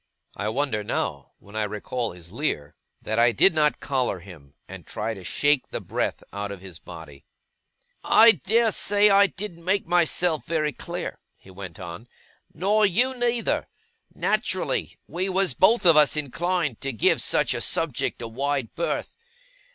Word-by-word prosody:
I 105 +1 -2
wonder 115 -3 -1
now, 70 -7 -3
when 100 +2 -16
I 110 - 0
recall 105 +3 -3
his 85 -1 -12
leer, 105 - -3 0.3
that 110 +1 -1
I 120 0 +5
did 170 - +4
not 150 -1 +2
collar 130 -7 -1
him, 80 -6 -14
and 95 -2 -10
try 110 +6 -4
to 95 -3 -10
shake 145 +8 +1
the - - -5
breath - - -3
out 100 0 -4
of 100 - -7
his 90 -4 -11
body. 75 -4 -12 0.8
'I 230 +1 +7
dare 225 +3 +3
say 205 +1 +3
I 200 +1 +6
didn't 190 -4 -8
make 190 +3 +1
myself 175 -1 +1
very 155 -3 0
clear,' - - -5 0.2
he 95 - -17
went 95 -3 -9
on, 90 +6 -8 0.4
'nor 205 +6 +1
you 235 +7 +3
neither. 240 -2 0 0.4
Naturally, - - -1
we 185 +3 -3
was 190 0 +1
both 215 +3 +4
of 165 -2 +7
us 150 0 +5
inclined 155 -1 -1
to 135 - -2
give 115 - +2
such - - +1
a - - -3
subject - - -1
a - - -4
wide 135 +1 -2
berth. 170 - -3
140 Hz, 165 wpm, -25 LUFS, -, 0.8 s, I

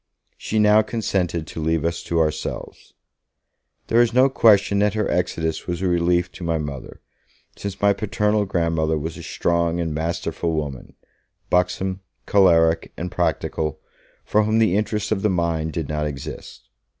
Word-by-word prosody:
She 110 - -3
now 105 0 +6
consented 95 -7 -2
to 80 - -7
leave 80 0 0
us 85 0 -1
to 85 - 0
ourselves. 80 -1 -3 0.9
There 115 - +3
is 120 0 +1
no 130 +2 +6
question 105 -5 +4
that 105 0 +2
her 110 - 0
exodus 80 -2 -1
was 90 +1 -3
a - - +2
relief 90 0 +1
to - - -10
my 85 -1 0
Mother, 70 -4 -7 0.5
since 100 -2 -6
my 100 0 +4
paternal 105 +1 0
grandmother 80 -3 0
was 80 +2 -4
a - - -9
strong 85 0 0
and 80 -2 -2
masterful 80 +1 -2
woman, 75 -5 -5 0.6
buxom, 95 +1 +1 0.3
choleric 85 -4 +3
and 90 +1 -4
practical, 75 -2 -1 0.5
for 105 - +3
whom 110 +1 +1
the 110 -5 +3
interests 105 0 -1
of 100 -3 0
the 105 - +2
mind 85 -3 -1
did 80 -4 -3
not 75 0 -2
exist. 70 -2 -8
85 Hz, 160 wpm, -22 LUFS, 80-100 Hz, 0.9 s, now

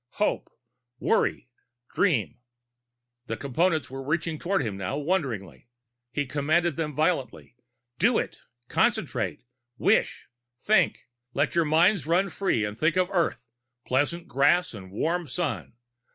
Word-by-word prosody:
"Hope! - - 0 0.5
"Worry! - - +1 0.5
"Dream!" 120 - +1 0.9
The 115 - -3
Components 155 +1 0
were 135 0 -5
reaching 155 +3 -1
toward 190 -2 0
him 105 -5 -3
now, 95 +7 -3
wonderingly. 130 - -2 0.4
He 145 +2 -1
commanded 155 +4 +1
them 150 -3 -3
violently: 155 -6 -1 0.4
"Do - - +4
it - - -3 0.3
concentrate, - - 0 0.3
wish, - - +2 0.3
think! 185 -2 +2 0.3
Let 145 +2 +1
your 170 -1 +3
minds 165 +3 +3
run 185 +4 +2
free 155 - 0
and 105 0 -5
think 155 +8 +1
of 185 0 +2
Earth, 170 -8 0 0.4
pleasant 145 +7 0
grass 175 +6 +3
and 95 -4 -9
warm 165 - -1
sun! 125 - -3
155 Hz, 125 wpm, -27 LUFS, 125-175 Hz, 0.9 s, Do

